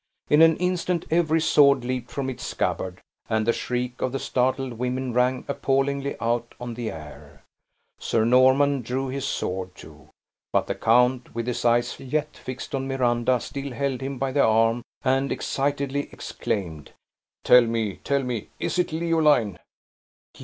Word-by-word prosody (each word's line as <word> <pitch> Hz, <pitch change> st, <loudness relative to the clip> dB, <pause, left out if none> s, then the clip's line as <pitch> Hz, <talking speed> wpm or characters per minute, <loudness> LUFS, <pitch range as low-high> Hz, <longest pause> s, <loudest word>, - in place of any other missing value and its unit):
In 150 Hz, +2 st, +6 dB
an 165 Hz, 0 st, +6 dB
instant 180 Hz, -1 st, -1 dB
every 165 Hz, -1 st, +3 dB
sword 140 Hz, -5 st, +4 dB
leaped 125 Hz, -1 st, -3 dB
from 140 Hz, -2 st, -3 dB
its 130 Hz, -2 st, -5 dB
scabbard, 95 Hz, 0 st, -3 dB, 0.3 s
and 110 Hz, -1 st, +1 dB
the 115 Hz, -, +3 dB
shriek 125 Hz, 0 st, -3 dB
of 130 Hz, -, 0 dB
the -, -, 0 dB
startled 130 Hz, 0 st, -1 dB
women 125 Hz, +1 st, -3 dB
rang 125 Hz, +1 st, +1 dB
appallingly 140 Hz, 0 st, 0 dB
out 120 Hz, +1 st, -1 dB
on 120 Hz, -1 st, -5 dB
the 115 Hz, -1 st, -4 dB
air. 75 Hz, -2 st, -11 dB, 0.6 s
Sir 110 Hz, -1 st, +1 dB
Norman 130 Hz, +3 st, +4 dB
drew 130 Hz, +3 st, -3 dB
his 135 Hz, +1 st, -3 dB
sword, 95 Hz, 0 st, -3 dB
too; -, -, -14 dB, 0.4 s
but -, -, +2 dB
the -, -, -2 dB
count, 125 Hz, +2 st, +2 dB
with 115 Hz, -1 st, -2 dB
his 125 Hz, -1 st, -3 dB
eyes 120 Hz, +1 st, +2 dB
yet 150 Hz, +3 st, -2 dB
fixed 130 Hz, 0 st, -7 dB
on 135 Hz, -1 st, -2 dB
Miranda, 125 Hz, -1 st, +1 dB
still 140 Hz, +2 st, -6 dB
held 135 Hz, 0 st, -2 dB
him 135 Hz, 0 st, -4 dB
by 135 Hz, +1 st, -1 dB
the 140 Hz, +1 st, +3 dB
arm, 115 Hz, +2 st, +3 dB, 0.2 s
and 135 Hz, +1 st, +1 dB
excitedly 140 Hz, 0 st, -1 dB
exclaimed, 80 Hz, -8 st, -4 dB, 0.5 s
"Tell 125 Hz, -, +8 dB
me, 115 Hz, -4 st, -1 dB
tell 140 Hz, 0 st, -1 dB
me, 120 Hz, -4 st, -4 dB
is -, -, -1 dB
it 175 Hz, -, +1 dB
Leoline?" 155 Hz, -, +2 dB
130 Hz, 160 wpm, -24 LUFS, 120-140 Hz, 0.6 s, Tell